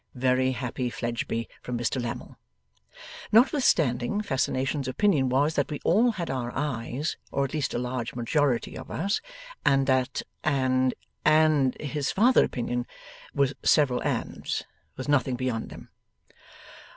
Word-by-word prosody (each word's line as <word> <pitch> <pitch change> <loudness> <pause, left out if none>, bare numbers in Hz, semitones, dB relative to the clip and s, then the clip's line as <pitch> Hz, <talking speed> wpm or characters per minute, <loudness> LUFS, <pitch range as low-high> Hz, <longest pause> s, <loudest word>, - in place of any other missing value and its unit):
['Very 130 +1 +2
happy, 125 0 -3
Fledgeby!' 115 +1 -3
from 125 -1 -4
Mr 120 +2 -1
Lammle.) 120 0 -5 1.0
Notwithstanding, 205 - +3
Fascination's 135 -2 -1
opinion 135 -1 +2
was 140 +5 +2
that - - 0
we 150 - -4
all 230 +7 +4
had 170 -8 -3
our 125 -2 -3
eyes 135 +1 -2
or 140 0 +1
at 135 - -6
least 150 -3 -1
a - - +1
large 125 -1 -3
majority 125 +1 0
of - - -8
us 200 +6 -1 0.4
and 135 0 +3
that 130 -1 +1 0.2
and 130 -3 +2 0.3
and 155 -4 +4
his 145 -1 -2
farther 240 +6 +5
opinion 120 0 -2 0.5
was 140 -1 +2
several 130 -5 +3
ands, - - -2 0.3
with 130 - -5
nothing 135 -3 +2
beyond 125 -3 -2
them. - - -11
130 Hz, 135 wpm, -27 LUFS, 125-150 Hz, 1.0 s, farther